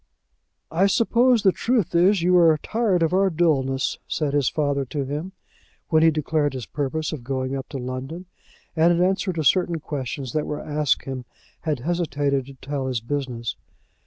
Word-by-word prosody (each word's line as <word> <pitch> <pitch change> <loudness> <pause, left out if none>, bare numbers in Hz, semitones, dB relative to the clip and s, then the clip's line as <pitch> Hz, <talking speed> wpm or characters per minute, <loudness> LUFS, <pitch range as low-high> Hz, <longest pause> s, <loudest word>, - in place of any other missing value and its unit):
"I 185 +5 +3
suppose 235 +3 +3
the 190 - +6
truth 225 -5 0
is 180 +2 +4
you 180 +1 +4
are 165 -3 +6
tired 215 -7 +1
of 165 - +1
our 195 +1 +3
dulness," 140 -6 +1
said 150 -3 -1
his 145 -4 +2
father 145 -2 0
to 140 +2 -3
him, 150 +7 -5 0.6
when 160 -2 +4
he 165 - +6
declared 155 -2 0
his 125 -4 -5
purpose 150 +2 -3
of 140 -6 -6
going 130 +1 -2
up 135 -1 -6
to 140 - -5
London, 130 +7 -5 0.5
and, 165 +1 +4
in 175 +1 +3
answer 190 0 0
to 165 -3 -2
certain 170 +3 +2
questions 135 -3 -5
that 155 - -1
were 150 - -3
asked 150 -3 0
him, 130 -2 -5 0.4
had 145 -5 -1
hesitated 145 -4 -1
to 140 - -11
tell 135 0 -4
his 125 -3 -1
business. 120 -2 -3
150 Hz, 180 wpm, -23 LUFS, 135-175 Hz, 0.6 s, the